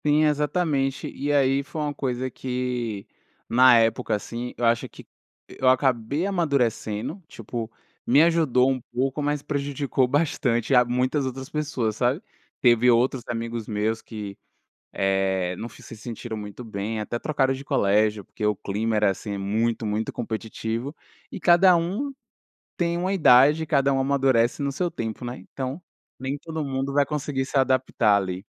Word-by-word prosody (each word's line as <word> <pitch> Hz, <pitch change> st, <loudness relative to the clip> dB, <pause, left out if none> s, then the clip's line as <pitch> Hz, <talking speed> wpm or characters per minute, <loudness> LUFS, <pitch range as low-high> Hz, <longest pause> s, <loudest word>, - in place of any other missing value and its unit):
Sim, 150 Hz, +1 st, +4 dB
exatamente. 150 Hz, -2 st, 0 dB
E 145 Hz, +2 st, -2 dB
aí 135 Hz, -1 st, +3 dB
foi 150 Hz, +3 st, -7 dB
uma 150 Hz, -1 st, -1 dB
coisa 130 Hz, -2 st, -2 dB
que, 125 Hz, -5 st, -3 dB, 0.4 s
na 125 Hz, 0 st, +6 dB
época, 115 Hz, -1 st, +2 dB
assim, 120 Hz, +4 st, -5 dB
eu 120 Hz, -, 0 dB
acho 115 Hz, 0 st, +2 dB
que -, -, -14 dB, 0.4 s
eu 130 Hz, -, +1 dB
acabei 130 Hz, +4 st, +1 dB
amadurecendo, 140 Hz, -, -1 dB
tipo 115 Hz, -2 st, -6 dB, 0.4 s
me 140 Hz, +6 st, +6 dB
ajudou 155 Hz, -7 st, +3 dB
um 130 Hz, -1 st, -2 dB
pouco, 130 Hz, +4 st, -1 dB
mas 145 Hz, 0 st, -1 dB
prejudicou 140 Hz, -2 st, -1 dB
bastante 130 Hz, -4 st, 0 dB
a 125 Hz, -1 st, +7 dB
muitas 125 Hz, +4 st, 0 dB
outras 130 Hz, 0 st, -5 dB
pessoas, 140 Hz, -8 st, -2 dB
sabe. 125 Hz, +5 st, +1 dB, 0.4 s
Teve 120 Hz, 0 st, +4 dB
outros 125 Hz, +2 st, +3 dB
amigos 115 Hz, -1 st, -4 dB
meus 110 Hz, +1 st, -1 dB
que, 105 Hz, -3 st, -7 dB, 0.6 s
eh, 95 Hz, -2 st, 0 dB
não 115 Hz, -, -6 dB
se -, -, -16 dB
se 115 Hz, -, -10 dB
sentiram 115 Hz, 0 st, -6 dB
muito 105 Hz, +3 st, -8 dB
bem, 110 Hz, 0 st, -4 dB
até 105 Hz, +2 st, -3 dB
trocaram 135 Hz, 0 st, 0 dB
de 135 Hz, +1 st, -8 dB
colégio 105 Hz, -5 st, +2 dB
porque 105 Hz, -, -7 dB
o 105 Hz, -1 st, +2 dB
clima 110 Hz, +4 st, -2 dB
era 105 Hz, -1 st, +3 dB
assim 100 Hz, +1 st, -5 dB
muito 110 Hz, +3 st, -1 dB
muito 105 Hz, +1 st, -2 dB
competitivo 115 Hz, +3 st, -4 dB, 0.4 s
e -, -, -6 dB
cada 180 Hz, +1 st, +6 dB
um 195 Hz, +12 st, -2 dB, 0.6 s
tem 170 Hz, -1 st, 0 dB
uma 185 Hz, +2 st, -1 dB
idade, 150 Hz, -2 st, +5 dB
cada 140 Hz, -2 st, +2 dB
um 135 Hz, -, +1 dB
amadurece 135 Hz, -2 st, +2 dB
no 140 Hz, -, 0 dB
seu 175 Hz, +5 st, -2 dB
tempo, 115 Hz, +2 st, -5 dB
né. 120 Hz, +1 st, -5 dB
Então, 135 Hz, +5 st, -4 dB, 0.4 s
nem 135 Hz, +2 st, -3 dB
todo 160 Hz, 0 st, -5 dB
mundo 135 Hz, 0 st, -2 dB
vai 145 Hz, 0 st, +3 dB
conseguir 140 Hz, -2 st, -2 dB
se 140 Hz, -, -1 dB
adaptar 130 Hz, -5 st, +3 dB
ali. 95 Hz, 0 st, -3 dB
125 Hz, 160 wpm, -24 LUFS, 115-140 Hz, 0.6 s, a